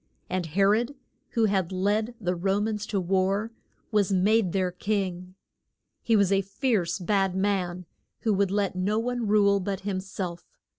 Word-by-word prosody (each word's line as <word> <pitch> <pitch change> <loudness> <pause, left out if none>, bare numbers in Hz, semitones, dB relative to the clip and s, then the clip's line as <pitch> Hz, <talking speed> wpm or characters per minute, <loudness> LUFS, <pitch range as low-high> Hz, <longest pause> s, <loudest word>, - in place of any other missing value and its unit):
And 185 -2 -1
He 185 +6 +1
rod, 230 +7 +2 0.4
who 230 -1 +3
had 195 -4 0
led 210 +5 0
the 180 -4 -1
Ro 195 +3 +1
mans 210 0 -2
to 205 - -1
war, 190 +4 0 0.4
was 205 -3 +2
made 195 +1 +3
their 185 -1 0
king. 185 -2 -3 0.7
He 230 - +2
was 200 -2 +3
a 195 0 +4
fierce, 195 -3 0
bad 195 0 +1
man, 185 -2 -1 0.4
who 220 - +1
would 200 -1 +2
let 200 -1 0
no 195 +4 0
one 240 0 -1
rule 200 -1 +4
but 195 0 -3
him 195 -1 -2
self. 185 -2 -6
195 Hz, 165 wpm, -27 LUFS, 185-210 Hz, 0.7 s, a